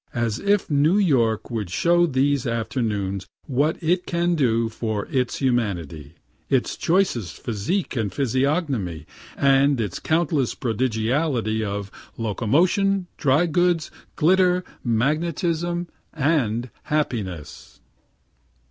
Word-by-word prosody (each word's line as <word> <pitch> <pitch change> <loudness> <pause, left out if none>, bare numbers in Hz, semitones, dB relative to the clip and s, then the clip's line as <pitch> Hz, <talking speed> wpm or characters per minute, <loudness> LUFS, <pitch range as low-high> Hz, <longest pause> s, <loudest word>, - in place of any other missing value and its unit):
As 120 -2 -1
if 200 0 +1
New 150 +5 +3
York 120 - +2
would 110 -6 -3
show 175 - +3
these 140 -2 +1
afternoons 110 -5 -2 0.2
what 145 +4 +1
it 175 +3 +1
can 175 0 +1
do 115 -7 +2
in 110 -3 -1
its 125 -2 0
humanity, 90 - -2 0.3
its - - +1
choicest 165 - 0
physique 120 - -2
and 110 -5 -1
physiognomy, 130 - -1 0.3
and 140 0 +4
its 105 -5 -2
countless 160 -5 0
prodigality 115 0 0
of 100 -1 -4 0.3
locomotion, 175 - +1
dry 145 +4 +3
goods, 175 0 +1 0.2
glitter, 180 +2 +3 0.2
magnetism, 165 +7 0 0.3
and 130 -6 0
happiness. 105 - -3
130 Hz, 105 wpm, -23 LUFS, 110-165 Hz, 0.3 s, and